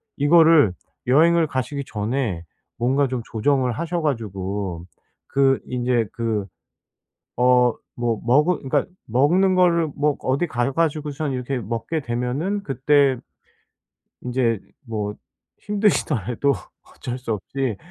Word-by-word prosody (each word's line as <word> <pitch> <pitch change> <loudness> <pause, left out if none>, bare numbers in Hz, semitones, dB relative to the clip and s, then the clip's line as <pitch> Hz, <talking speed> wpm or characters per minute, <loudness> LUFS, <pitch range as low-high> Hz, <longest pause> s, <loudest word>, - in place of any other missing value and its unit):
이거를 155 - +5 0.3
여행을 165 +5 +4
가시기 140 +2 -3
전에 105 -4 -2 0.3
뭔가 135 +4 +2
좀 130 -1 -3
조정을 130 +2 +1
하셔 170 +5 -2
가지고 100 - -3 0.4
그 135 -1 +3
인제 125 -2 0
그 115 -4 -1 0.9
어 125 -1 +4 0.2
뭐 120 -2 -1
먹으 150 +8 +3
그러니까 135 - 0 0.2
먹는 170 - +3
거를 170 -3 +4
뭐 150 0 +1
어디 135 +6 0
가 120 -2 -1
가지고서 150 -1 -1
이렇게 130 0 -2
먹게 115 +8 -3
되면은 135 +11 -2
그때 135 -2 +2 1.0
인제 120 -4 0 0.3
뭐 105 -2 -3 0.4
힘드시더라도 145 - +1 0.3
어쩔 125 +1 -7
수 125 -3 -3
없이 120 +3 -3
130 Hz, 235 characters per minute, -22 LUFS, 115-150 Hz, 1.0 s, 이거를